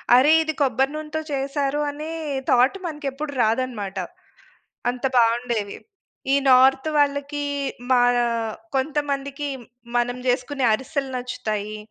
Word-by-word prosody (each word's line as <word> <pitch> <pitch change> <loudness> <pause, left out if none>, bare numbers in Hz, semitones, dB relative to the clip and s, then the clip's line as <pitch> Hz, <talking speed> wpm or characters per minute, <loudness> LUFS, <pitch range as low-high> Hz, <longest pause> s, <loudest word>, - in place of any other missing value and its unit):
అరె! 275 +5 +6
ఇది 315 - -2
కొబ్బరి 270 +1 +2
నూనెతో 310 0 -4
చేసారు 275 +1 -1
అనే 305 +2 -7 0.4
థాట్ 255 +9 +4
మనకు 295 -3 -5
ఎప్పుడు 290 +2 -5
రాదన్నమాట. 220 -4 -1 0.9
అంత 250 +1 -10
బాగుండేవి. 230 -3 +1 0.6
ఈ - - +6
నార్త్ 265 +3 +5
వాళ్ళకి 285 0 0 0.5
మన 245 0 +4 0.6
కొంతమందికి 280 0 -1 0.5
మనం 245 +1 0
చేసుకునే 255 +2 0
అరిసెలు 270 +3 -2
నచ్చుతాయి, 215 -4 -4
265 Hz, 105 wpm, -23 LUFS, 245-285 Hz, 0.9 s, అరె